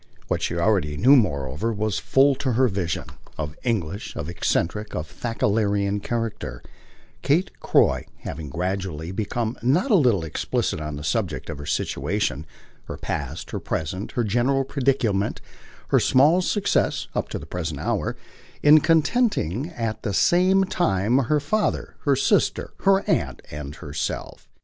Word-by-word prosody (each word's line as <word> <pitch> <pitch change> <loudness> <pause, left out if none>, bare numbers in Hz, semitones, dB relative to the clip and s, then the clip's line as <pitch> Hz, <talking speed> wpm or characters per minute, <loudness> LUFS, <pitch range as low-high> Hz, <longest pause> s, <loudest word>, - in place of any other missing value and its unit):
What - - 0
she 85 - -1
already 85 -5 +1
knew 130 - +6
moreover 75 - +1
was 105 -2 -1
full, 140 +1 +4
to 130 -3 -1
her 130 +3 +4
vision, 95 -6 -2 0.3
of 75 -1 -4
English, 100 -5 -2
of 70 - -4
eccentric, 105 +4 -1
of 75 - -2
Thackerayan 100 +1 0
character 115 - -4 0.6
Kate 170 +7 +2
Croy - - +2
having 75 -3 -6
gradually 90 0 -3
become 110 +4 -2
not 155 - +2
a - - +7
little 120 - +3
explicit 80 0 -2
on 75 -1 -4
the 75 - -7
subject 75 - -2
of - - -7
her 75 - -7
situation, 85 - -1 0.4
her - - -6
past, - - -4
her - - -3
present, 90 +6 -4
her 120 - 0
general 125 +6 +1
predicament, 125 -7 0 0.5
her - - +4
small 150 +8 +4
success, 205 +2 0
up - - -2
to - - -3
the - - -8
present 80 -5 -4
hour, - - -1 0.5
in 150 +1 +8
contenting 160 - +1
at 115 -8 -4
the 100 -4 -2
same 185 - +4
time 125 - +1
her 145 +4 +2
father, 185 +10 -1
her - - +4
sister, - - +1
her 195 0 +5
aunt - - 0
and 75 0 -6
herself. 75 -3 -5
105 Hz, 150 wpm, -24 LUFS, 85-135 Hz, 0.6 s, in